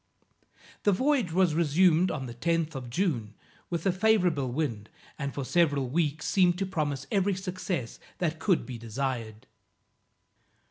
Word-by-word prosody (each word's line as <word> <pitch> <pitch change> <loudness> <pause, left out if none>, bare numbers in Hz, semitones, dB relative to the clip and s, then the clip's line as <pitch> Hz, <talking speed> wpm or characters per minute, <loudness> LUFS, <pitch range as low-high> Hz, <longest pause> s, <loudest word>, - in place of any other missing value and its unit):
The 205 - +3
voyage 255 - +1
was 180 -1 +3
resumed 170 +2 +4
on 130 - -3
the 120 - -7
10th 165 +5 0
of 130 -3 -6
June, 120 - -1 0.3
with 170 -1 -3
a 190 - +4
favorable 180 - +2
wind, 120 -7 -2 0.3
and 140 -1 -2
for 140 -1 -4
several 145 -4 +2
weeks, 160 0 0
seemed 180 -2 +3
to 195 - -1
promise 150 -7 -2
every 200 -2 +2
success 180 -8 -4 0.2
that 160 -2 -1
could 185 -3 +2
be 125 -3 -7
desired. 115 -2 -4
160 Hz, 145 wpm, -28 LUFS, 130-185 Hz, 0.3 s, resumed